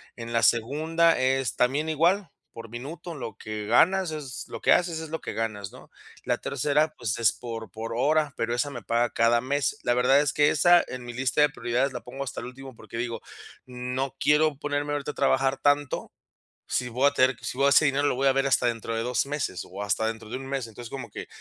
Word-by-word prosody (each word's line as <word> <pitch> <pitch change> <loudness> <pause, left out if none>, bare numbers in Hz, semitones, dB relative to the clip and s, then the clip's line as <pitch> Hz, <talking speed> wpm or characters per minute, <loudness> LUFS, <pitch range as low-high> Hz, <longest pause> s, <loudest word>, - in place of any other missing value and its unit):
En 115 -1 -7
la 115 0 +2
segunda 155 +9 +3
es, 130 -1 +1
también 140 +6 +1
igual, 170 +5 +2 0.2
por 115 0 -9
minuto, 150 +8 -7
lo 120 -5 -7
que 110 -1 -6
ganas 180 - +3
es 140 -5 -6
lo - - -6
que - - +5
haces 170 -2 +1
es 160 - -6
lo 160 - -4
que - - -5
ganas, 105 -3 -3
¿no? - - -15 0.4
La - - +1
tercera, 150 +1 0
pues, 120 -2 -2
es 115 -3 +4
por 115 -5 -7
por 115 +2 -5
hora, 150 +2 +2
pero 115 +1 -1
esa 135 +4 0
me 120 -6 -8
paga 120 +1 +1
cada 115 +1 +3
mes. 140 +2 -1
La 120 - +2
verdad 125 +3 +4
es 145 -1 +1
que 145 0 +4
esa, 175 +3 +5
en 125 -1 -7
mi 120 - -7
lista 130 +3 -1
de 150 - +7
prioridades, 130 0 -1
la 125 - -5
pongo 135 +3 -6
hasta 125 - -5
el 120 - -6
último 130 0 -10
porque 110 0 -10
digo: 115 0 -3 0.4
"No 125 +2 -4
quiero 150 -1 +3
ponerme 145 0 -2
ahorita 145 0 -2
a - - -18
trabajar 135 0 +1
tanto, 145 -1 +1 0.6
si 125 -1 -1
voy 130 +4 +2
a - - -2
tener 130 -2 +3
si - - -5
voy 140 +1 +3
a - - +4
ese 150 +2 +6
dinero 140 +1 +2
lo - - +2
voy 135 +2 +2
a 135 - +5
ver 135 +1 +1
hasta 135 -2 +2
dentro 115 -1 -2
de 115 - -1
2 125 -2 0
meses 140 - -3
o 100 +2 -7
hasta 105 +2 0
dentro 110 -1 -5
de 125 - -4
un 135 - -7
mes". 135 -3 -3
Entonces, 115 +1 -10
como 135 - -7
que - - -7
130 Hz, 235 wpm, -26 LUFS, 120-145 Hz, 0.6 s, de